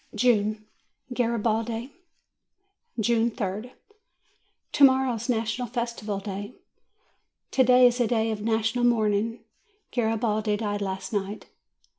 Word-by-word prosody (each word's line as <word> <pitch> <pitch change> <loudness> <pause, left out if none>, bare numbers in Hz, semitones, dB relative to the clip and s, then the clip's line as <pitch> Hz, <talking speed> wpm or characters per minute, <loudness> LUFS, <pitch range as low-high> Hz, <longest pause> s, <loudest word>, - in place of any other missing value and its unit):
JUNE 215 -2 +2 0.5
GARIBALDI 230 +1 -1 1.1
June 230 +1 +2
3d. 215 +2 -4 1.0
To 285 - +2
morrow 265 -1 +5
is 230 +1 -5
the 245 - +2
National 225 +2 -2
Festival 235 -4 -3
Day. 200 +2 -6 1.0
TO 260 - +4
DAY 250 0 +6
is 245 0 +3
a 240 - +3
day 225 -1 +1
of 210 -1 -4
national 225 +2 0
mourning. 225 -1 +1 0.5
Garibaldi 220 -2 0
died 205 -1 -2
last 190 +1 -4
night. 205 +1 -3
225 Hz, 115 wpm, -26 LUFS, 210-240 Hz, 1.1 s, DAY